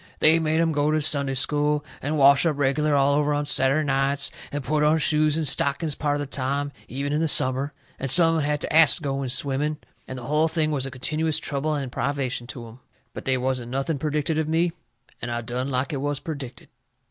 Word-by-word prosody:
They 160 +2 +4
made 160 0 0
'em 165 -1 +2
go 145 0 0
to 155 0 +1
Sunday 140 -3 0
School, 150 +2 0 0.2
and 150 +3 -2
wash 140 0 +5
up 160 -4 0
reg'lar 145 +2 +1
all 140 0 +3
over 145 0 +1
on 145 0 -1
Saturday 140 +1 +2
nights, 140 0 +1 0.2
and 145 -1 -4
put 150 +4 0
on 150 +1 +3
shoes 155 -1 +2
and 160 -2 +1
stockings 140 +3 +2
part 145 0 -1
of - - -3
the - - -3
time, 140 +1 -3 0.2
even 140 +3 -4
in 150 - 0
the 165 - +1
summer, 135 0 +3 0.3
and 135 - -3
some 165 +5 +7
of 160 - 0
'em 145 - -1
had 150 -1 -1
to - - -4
ast 160 -1 +6
to 160 - -12
go 135 -1 -2
in 135 - -3
swimming, 140 +4 -1 0.3
and 130 - -7
the 125 - -8
hull 150 +4 +2
thing 160 -1 -1
was 135 -3 -2
a - - -5
continuous 155 +4 -1
trouble 150 +2 -2
and 135 -4 -4
privation 130 -3 -3
to 120 -2 -8
'em. 115 +3 -14 0.3
But - - -8
they 130 -1 +1
wasn't 125 -1 -2
nothing 135 +3 -2
perdicted 150 +1 -1
of 155 - -1
me, 165 +2 +1 0.5
and 120 - -4
I 120 0 -3
done 125 +3 -4
like 130 +2 -2
it - - -2
was 145 -1 -2
perdicted. 140 -6 -8
145 Hz, 235 wpm, -24 LUFS, 135-155 Hz, 0.5 s, some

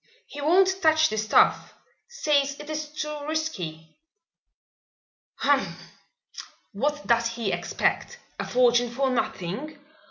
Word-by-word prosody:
He 290 - -9
won't 380 +5 +3
touch 315 -1 +4
the 215 - -3
stuff 215 0 +2 0.3
says 285 -11 0
it 295 +1 -8
is 305 -1 -4
too 300 -1 -5
risky." 185 - -4 1.4
"Humph! 280 -1 -1 0.8
What 295 +7 -2
does 235 0 +2
he 230 -3 -3
expect? - - -1 0.2
A - - -3
fortune 245 -1 +3
for 265 +3 0
nothing? 235 - -3
285 Hz, 115 wpm, -25 LUFS, 235-310 Hz, 1.4 s, touch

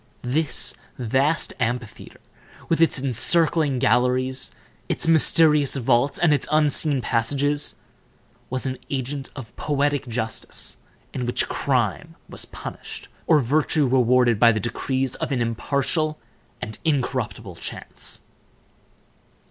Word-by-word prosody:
This 140 +5 +1 0.2
vast 135 +6 +1
amphitheater, 120 -1 -4 0.5
with 165 0 +1
its 165 -4 +4
encircling 145 +3 +1
galleries, 125 +1 +1 0.4
its - - +2
mysterious 155 -3 +4
vaults, 130 +1 +1
and 170 -4 +3
its 145 - +1
unseen 150 -2 +3
passages, 140 +5 0 0.7
was 130 +1 -3
an 130 -1 -3
agent 135 0 -3
of 115 -6 -10
poetic 145 -1 0
justice, 115 -1 -3 0.4
in 125 -2 -3
which 120 - 0
crime - - -1
was - - -2
punished, - - -9 0.2
or 160 - +6
virtue 150 +3 +2
rewarded, 125 -2 +3
by 115 0 +7
the 110 - -1
decrees 130 +4 -2
of - - -3
an 130 - 0
impartial 140 +7 0 0.5
and 110 - -6
incorruptible 145 -6 -2
chance. - - -7
135 Hz, 115 wpm, -23 LUFS, 125-150 Hz, 0.7 s, by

